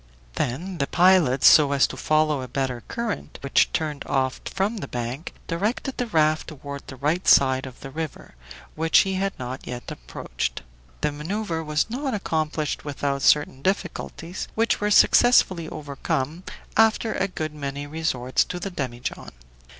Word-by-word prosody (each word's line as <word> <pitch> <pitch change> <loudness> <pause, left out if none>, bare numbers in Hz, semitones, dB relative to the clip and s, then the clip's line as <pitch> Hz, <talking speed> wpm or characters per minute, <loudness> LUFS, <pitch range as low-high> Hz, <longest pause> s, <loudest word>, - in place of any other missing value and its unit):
Then 170 - -3
the 140 - +1
pilot, 175 -7 +4
so 145 -2 +7
as 140 - +4
to - - -5
follow 155 -2 +1
a 130 - -6
better 130 -1 -2
current, 230 -8 -4
which 140 -1 +3
turned 150 -3 -2
off 130 -1 0
from 200 +4 -1
the - - -5
bank, 120 +6 -4
directed 210 +10 -2
the 245 - -1
raft 155 -5 +2
toward 140 -1 -8
the 135 - -8
right 150 +7 -1
side 130 -1 +5
of 130 - -12
the 135 - -8
river, 155 0 -6 0.4
which 160 +1 +4
he 195 - -1
had 195 +1 -1
not 130 +1 -6
yet 125 -1 -6
approached. - - -5 0.4
The 150 - +1
maneuver 165 +3 -3
was 150 -1 0
not 260 +2 -2
accomplished 155 -5 -2
without 140 -1 -2
certain 145 -2 +3
difficulties, 180 -1 -3
which 225 -1 +1
were 210 - +1
successfully 195 -6 +5
overcome 145 +3 -3 0.3
after 225 0 +3
a 195 - 0
good 155 -5 -4
many 140 -1 -5
resorts 145 -5 0
to 180 - -5
the 195 +2 -4
demijohn. 125 -7 -5
155 Hz, 160 wpm, -24 LUFS, 135-185 Hz, 0.4 s, so